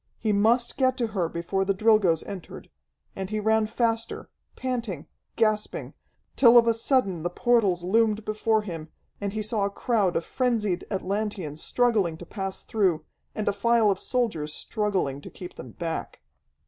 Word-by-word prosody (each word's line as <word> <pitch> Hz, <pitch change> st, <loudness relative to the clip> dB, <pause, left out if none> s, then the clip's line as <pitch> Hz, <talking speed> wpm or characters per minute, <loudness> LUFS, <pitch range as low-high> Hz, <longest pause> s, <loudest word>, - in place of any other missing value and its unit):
He 220 Hz, -, 0 dB
must 230 Hz, +4 st, +2 dB
get 260 Hz, -1 st, +2 dB
to 235 Hz, -3 st, 0 dB
her 175 Hz, -5 st, 0 dB
before 170 Hz, +4 st, -1 dB
the 195 Hz, 0 st, 0 dB
Drilgoes 205 Hz, -6 st, +3 dB
entered. 190 Hz, -3 st, -9 dB, 0.4 s
And 190 Hz, -1 st, -4 dB
he 215 Hz, 0 st, -1 dB
ran 220 Hz, +1 st, +2 dB
faster, 230 Hz, 0 st, -1 dB, 0.2 s
panting, 235 Hz, -, -3 dB, 0.3 s
gasping, 215 Hz, -2 st, 0 dB, 0.4 s
till 240 Hz, -2 st, +7 dB
of 235 Hz, -, +7 dB
a 230 Hz, -, +4 dB
sudden 225 Hz, -, +1 dB
the 175 Hz, -, -1 dB
portals 200 Hz, -3 st, +2 dB
loomed 215 Hz, +2 st, +2 dB
before 215 Hz, 0 st, +1 dB
him, 165 Hz, -5 st, -7 dB, 0.3 s
and 200 Hz, -1 st, -2 dB
he 215 Hz, 0 st, -2 dB
saw 215 Hz, -1 st, 0 dB
a -, -, 0 dB
crowd 200 Hz, -3 st, 0 dB
of 165 Hz, -, 0 dB
frenzied 220 Hz, -8 st, -1 dB
Atlanteans 195 Hz, -6 st, -3 dB
struggling 215 Hz, -10 st, +1 dB
to 175 Hz, -, -10 dB
pass 195 Hz, +1 st, -5 dB
through, 180 Hz, -8 st, +1 dB, 0.3 s
and 215 Hz, -, -3 dB
a 205 Hz, -, +3 dB
file 225 Hz, +1 st, +3 dB
of 190 Hz, -, -2 dB
soldiers 190 Hz, -12 st, -1 dB
struggling 195 Hz, -11 st, -1 dB
to -, -, -9 dB
keep 180 Hz, -, -9 dB
them 125 Hz, -2 st, -10 dB
back. 165 Hz, -2 st, -5 dB
210 Hz, 165 wpm, -26 LUFS, 180-225 Hz, 0.4 s, till